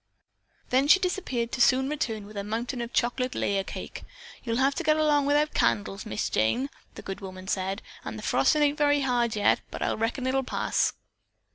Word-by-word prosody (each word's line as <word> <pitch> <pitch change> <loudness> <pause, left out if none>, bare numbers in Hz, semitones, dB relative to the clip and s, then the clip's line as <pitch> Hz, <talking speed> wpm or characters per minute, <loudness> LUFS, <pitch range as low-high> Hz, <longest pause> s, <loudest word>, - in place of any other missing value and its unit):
Then 265 +3 +3
she 380 - +7
disappeared 345 -11 -2
to 255 - -2
soon 260 +2 +4
return 225 -8 -3
with 210 +1 -12
a 200 - -3
mountain 235 +4 -3
of 235 - -4
a - - -31
chocolate 250 +1 0
layer 195 -1 0
cake. - - -7 0.4
"You'll 230 -1 -1
have 270 +2 +3
to 345 - -3
get 310 -1 +3
along 295 -2 +3
without 295 +1 +2
candles, 100 -3 0
Miss 110 - -2
Jane," 245 - 0 0.2
the - - -9
good 195 +1 -6
woman 185 -1 -9
said, 190 +2 -2 0.2
"an' - - -6
the - - -8
frostin' 300 -2 +3
ain't 290 +1 +1
very 290 -1 +3
hard 240 -4 +1
yet, 205 - +3
but - - -5
I - - +1
reckon 230 +4 -2
it'll 265 +1 +1
pass." 265 - 0
245 Hz, 205 wpm, -27 LUFS, 205-285 Hz, 0.4 s, she